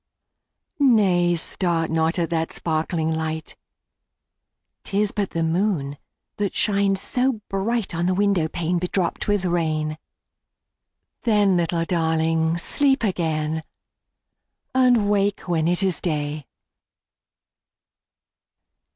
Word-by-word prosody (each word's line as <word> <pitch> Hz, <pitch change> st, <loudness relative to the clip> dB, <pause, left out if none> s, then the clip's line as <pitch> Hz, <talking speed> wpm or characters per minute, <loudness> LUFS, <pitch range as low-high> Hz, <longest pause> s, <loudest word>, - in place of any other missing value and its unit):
10 270 Hz, -4 st, +5 dB
Nay! 175 Hz, -4 st, +3 dB
start 165 Hz, -1 st, 0 dB
not 160 Hz, +1 st, +1 dB
at 170 Hz, -1 st, -1 dB
that 165 Hz, -1 st, -1 dB
sparkling 160 Hz, 0 st, -1 dB
light; 160 Hz, 0 st, -4 dB, 1.3 s
'Tis 205 Hz, +1 st, 0 dB
but 200 Hz, -2 st, -2 dB
the 165 Hz, -, -2 dB
moon 165 Hz, -4 st, 0 dB, 0.4 s
that 205 Hz, -2 st, -2 dB
shines 200 Hz, -2 st, +1 dB
so 255 Hz, +6 st, +2 dB, 0.2 s
bright 205 Hz, +2 st, -1 dB
On 170 Hz, +1 st, -1 dB
the 185 Hz, -, +1 dB
window 200 Hz, -5 st, +2 dB
pane 170 Hz, +2 st, -1 dB
bedropped 180 Hz, 0 st, -2 dB
with 205 Hz, -2 st, +1 dB
rain: 155 Hz, -3 st, -1 dB, 1.2 s
Then, 210 Hz, -5 st, +3 dB
little 170 Hz, -1 st, 0 dB
Darling! 160 Hz, -1 st, +1 dB
sleep 270 Hz, -, +2 dB
again, 160 Hz, -5 st, -1 dB, 1.1 s
And 250 Hz, -5 st, +4 dB
wake 205 Hz, -1 st, +1 dB
when 165 Hz, -3 st, -1 dB
it 175 Hz, +2 st, +1 dB
is 190 Hz, -3 st, 0 dB
day. 150 Hz, -4 st, -3 dB
175 Hz, 110 wpm, -23 LUFS, 160-200 Hz, 1.3 s, 10